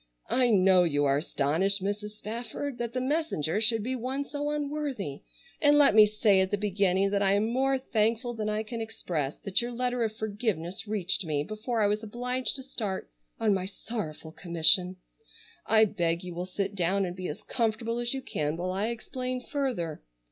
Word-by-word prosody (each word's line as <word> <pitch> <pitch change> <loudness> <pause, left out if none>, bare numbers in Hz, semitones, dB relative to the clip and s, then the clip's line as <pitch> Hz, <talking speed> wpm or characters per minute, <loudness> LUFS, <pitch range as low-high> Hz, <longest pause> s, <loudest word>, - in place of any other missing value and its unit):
"I 255 -1 +4
know 190 -3 +5
you 145 -4 +1
are 140 0 +3
astonished, 170 +7 +1
Mrs. 210 +1 -3
Spafford, 240 +5 -5
that 235 -1 -3
the 255 - 0
messenger 255 - 0
should 225 -1 +3
be 255 +3 -2
one 260 +3 -3
so 290 +1 -3
unworthy, 290 - -3 0.4
and 290 0 +6
let 285 -5 +6
me 215 0 +8
say 210 -2 +3
at 190 - +1
the 205 - 0
beginning 195 -1 +1
that 200 0 +1
I 195 -1 +3
am 205 +2 +2
more 265 +2 +2
thankful 230 -1 0
than 215 -2 -2
I 215 +1 -1
can 230 +1 -5
express 165 -10 -3
that 195 +2 0
your 240 +1 -3
letter 250 0 -1
of 220 -1 -2
forgiveness 205 -3 -3
reached 200 -1 0
me 150 -3 -1
before 215 - -2
I - - +4
was 210 +1 +1
obliged 245 +3 -2
to 265 - -6
start 210 - -4 0.3
on 215 -2 +3
my 190 -1 -1
sorrowful 195 -7 -6
commission. 170 +2 +3 0.7
I 220 0 +6
beg 170 -4 -1
you 180 -1 -6
will 175 +2 -4
sit 195 +2 -2
down 195 +1 +1
and 175 -1 -5
be 185 -1 -4
as 150 - -6
comfortable 230 0 -1
as 240 0 -1
you 270 -1 -3
can 150 -5 -2
while 180 +1 -2
I 195 +3 -1
explain 250 +2 -4
further. 250 - -3
210 Hz, 190 wpm, -28 LUFS, 185-240 Hz, 0.7 s, me